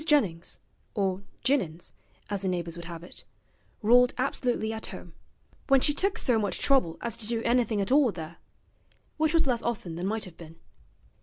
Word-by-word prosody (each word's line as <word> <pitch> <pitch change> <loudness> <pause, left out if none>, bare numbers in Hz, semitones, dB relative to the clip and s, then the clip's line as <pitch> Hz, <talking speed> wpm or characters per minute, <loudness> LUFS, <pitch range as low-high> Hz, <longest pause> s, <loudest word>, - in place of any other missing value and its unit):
Jennings 215 - +1 0.4
(or 195 -2 0 0.2
Jinnins, 185 - 0 0.3
as 200 -2 -2
the 195 - -1
neighbours 170 -2 -2
would 170 0 -8
have 170 -1 -7
it) 175 - -11 0.6
ruled 245 +3 +5
absolutely 245 -4 0
at 220 - -5
home, - - -10 0.5
when 270 -1 +6
she 295 +3 +3
took 390 +6 +1
so 240 -4 +2
much 205 -2 -1
trouble 255 -13 +2
as 235 -2 -1
to 215 - -1
do 230 -1 0
anything 235 -3 +2
at 195 - -1
all 275 -4 +5
there 165 -2 -8 0.8
which 315 0 +2
was 325 - +4
less 245 -3 +1
often 200 -9 -3
than 180 +2 -2
might 220 +1 -1
have 175 -3 -12
been. 165 -1 -11
220 Hz, 180 wpm, -28 LUFS, 175-250 Hz, 0.8 s, when